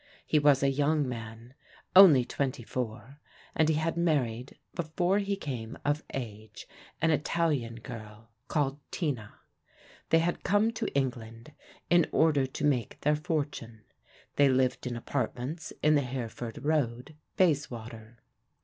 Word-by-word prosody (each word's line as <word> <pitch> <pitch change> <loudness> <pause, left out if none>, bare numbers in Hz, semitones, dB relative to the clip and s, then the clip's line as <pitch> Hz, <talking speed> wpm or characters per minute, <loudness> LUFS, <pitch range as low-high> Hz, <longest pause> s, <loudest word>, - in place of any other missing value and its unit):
He 155 - +3
was 145 -2 +4
a - - +4
young 145 +1 +1
man, 115 0 -7 0.4
only 160 -10 +9
twenty 130 -2 -2
four, 120 +3 -5 0.3
and 160 -1 +2
he 160 - +3
had 160 +2 -1
married, 135 -8 -1 0.2
before 175 +4 0
he 200 0 -1
came 125 - -6
of 145 +1 0
age, 110 -4 -7 0.4
an 160 - +4
Italian 150 -5 0
girl 115 -2 -10 0.2
called 145 -2 0
Tina. 130 - -3 0.7
They 165 - +5
had 170 +2 0
come 205 +3 +3
to 230 - -3
England 120 -1 -3 0.4
in 175 -1 +5
order 150 -4 +3
to 130 - -3
make 125 -7 0
their 150 +1 +3
fortune. 145 -8 -4 0.5
They 140 -1 +6
lived 130 -1 +1
in 120 - -3
apartments 130 +5 -3
in 155 +1 +5
the 145 - +4
Hereford 120 -1 -5
Road, 140 -2 -1 0.2
Bayswater. 120 -9 -1
135 Hz, 135 wpm, -29 LUFS, 120-155 Hz, 0.7 s, only